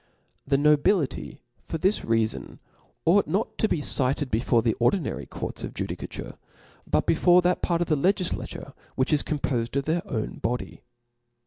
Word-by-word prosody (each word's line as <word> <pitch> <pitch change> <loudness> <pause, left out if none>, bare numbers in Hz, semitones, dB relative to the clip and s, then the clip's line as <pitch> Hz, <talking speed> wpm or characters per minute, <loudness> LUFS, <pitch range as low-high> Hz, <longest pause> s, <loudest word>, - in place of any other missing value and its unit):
The 140 - +3
nobility, 150 +1 +1 0.3
fbr 165 - -3
this 190 +6 +2
reafon, 115 -1 -1 0.5
ought 195 +5 +4
not 190 +8 -1
to 220 - +3
be 155 - 0
cited 140 0 +1
before 115 +1 +2
the 115 - +2
ordinary 140 +8 0
courts - - -6
of - - -6
judicature, - - -6 0.5
jput - - +2
before 175 +2 +4
that 180 0 +1
part 170 -1 0
of 175 - 0
the 155 - +2
Icgiflature 180 +4 -1 0.2
which 130 +3 +1
is 145 - +4
compofed 130 -5 -2
of 140 -1 0
their 165 +2 +1
owa 110 -9 -4
body. 120 +2 -3
150 Hz, 155 wpm, -26 LUFS, 125-175 Hz, 0.5 s, ought